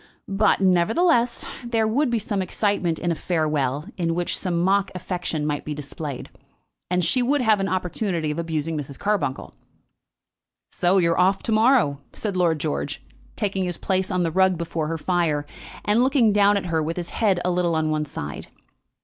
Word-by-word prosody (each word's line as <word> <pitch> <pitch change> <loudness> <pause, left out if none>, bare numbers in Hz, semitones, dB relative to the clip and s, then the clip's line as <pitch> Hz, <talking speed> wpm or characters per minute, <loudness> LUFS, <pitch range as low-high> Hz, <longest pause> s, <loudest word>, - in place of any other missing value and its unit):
But, 200 0 +2
nevertheless, 230 - +2 0.2
there 230 -2 +1
would 265 +5 +1
be 240 - +1
some 205 -2 -2
excitement 185 -3 0
in 175 - -1
a - - +2
farewell 150 -4 -1
in 165 -2 0
which 175 0 -1
some 175 -3 -1
mock 195 +3 +2
affection 175 -4 -3
might 145 -1 -2
be 150 - -4
displayed, 145 -1 -6 0.6
and 180 -1 +1
she 255 - +2
would 275 +3 +2
have 220 -4 +3
an 195 0 -1
opportunity 180 -3 -1
of 150 - -4
abusing 160 -1 -2
Mrs. 140 -2 -5
Carbuncle. 190 -11 -2 1.2
"So 180 +2 +2
you 170 -3 +3
are 165 - 0
off 190 +2 +3
to - - -1
morrow?" 220 - +3
said 205 -3 -3
Lord 170 -3 +2
George, 70 - -3 0.3
taking 195 -2 -1
his 175 -2 -3
place 190 -1 0
on 180 -2 0
the 165 - 0
rug 190 +1 +3
before 165 -2 -3
her 165 +1 -2
fire, 160 -4 0 0.4
and 210 +3 +3
looking 255 -5 +3
down 205 0 +4
at 200 - -3
her 165 -2 0
with 165 +3 -3
his 175 -1 -4
head 200 -5 +1
a 180 - +2
little 175 -2 +1
on 155 -1 0
one 155 0 0
side. 75 - -7
180 Hz, 185 wpm, -23 LUFS, 160-205 Hz, 1.2 s, down